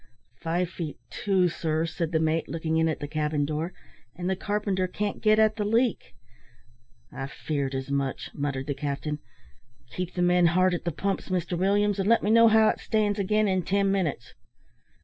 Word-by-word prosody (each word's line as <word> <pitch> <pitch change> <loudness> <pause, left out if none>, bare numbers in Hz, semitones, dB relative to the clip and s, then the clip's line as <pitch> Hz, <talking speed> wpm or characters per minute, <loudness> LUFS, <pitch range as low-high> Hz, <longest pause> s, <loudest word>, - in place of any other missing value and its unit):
"Five 175 +2 0
feet 165 -5 -5
two, 190 -3 +2
sir," 160 -1 -1
said 165 0 -3
the 160 - +2
mate, 160 0 0
looking 160 -1 -1
in 160 0 +3
at 160 - -2
the 145 - -3
cabin 150 -1 -1
door; 155 +4 -3 0.4
"and 180 0 -4
the 190 - +1
carpenter 200 -1 -1
can't 205 +2 -3
get 215 0 +4
at 215 0 +3
the 210 - 0
leak." 230 +3 0 1.0
"I 135 +1 -5
feared 140 -1 -3
as 130 +1 -4
much," 140 -1 -2
muttered 140 -2 -3
the 145 - -2
captain. 145 +2 -3 0.7
"Keep 180 -1 -5
the 180 - +1
men 175 0 +4
hard 185 +2 +3
at 175 - -3
the 170 - 0
pumps, 195 +6 -3
Mr 180 -1 -1
Williams, 200 +3 +2
and 195 +2 +1
let 230 - +4
me 210 - +2
hear 230 0 +7
how 220 0 +5
it - - -1
stands 210 -1 0
again 210 +2 +2
in 185 -1 +1
ten 195 +2 +1
minutes." 170 -11 -2
180 Hz, 190 wpm, -27 LUFS, 155-200 Hz, 1.0 s, hear